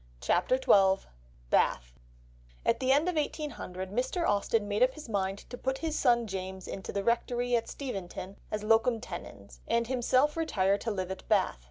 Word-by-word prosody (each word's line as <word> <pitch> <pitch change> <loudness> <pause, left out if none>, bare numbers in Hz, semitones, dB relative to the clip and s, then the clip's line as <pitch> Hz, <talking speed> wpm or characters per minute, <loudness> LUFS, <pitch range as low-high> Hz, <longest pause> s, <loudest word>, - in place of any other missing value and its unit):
CHAPTER 180 - +2
XII 195 -6 +4 0.5
BATH - - +2 0.7
At - - +2
the 260 0 +2
end 290 +5 +4
of 360 - +1
1800, 190 - -3
Mr. 260 - 0
Austen 205 +1 +1
made 205 +2 -1
up 255 +1 +4
his 305 -3 -9
mind 195 -2 -2
to 245 - -7
put 265 0 -1
his 320 0 -2
son 240 -4 +3
James 190 -2 -5
into 190 - -6
the 200 - -2
rectory 240 +2 +1
at 230 -1 -1
Steventon 195 -6 -6
as 215 0 -3
locum 225 +2 +3
tenens, 240 - -9
and 235 0 +2
himself 260 +4 +2
retire 200 - +1
to 230 - -3
live 190 -3 -3
at 190 - -8
Bath. - - +2
230 Hz, 175 wpm, -30 LUFS, 195-255 Hz, 0.7 s, XII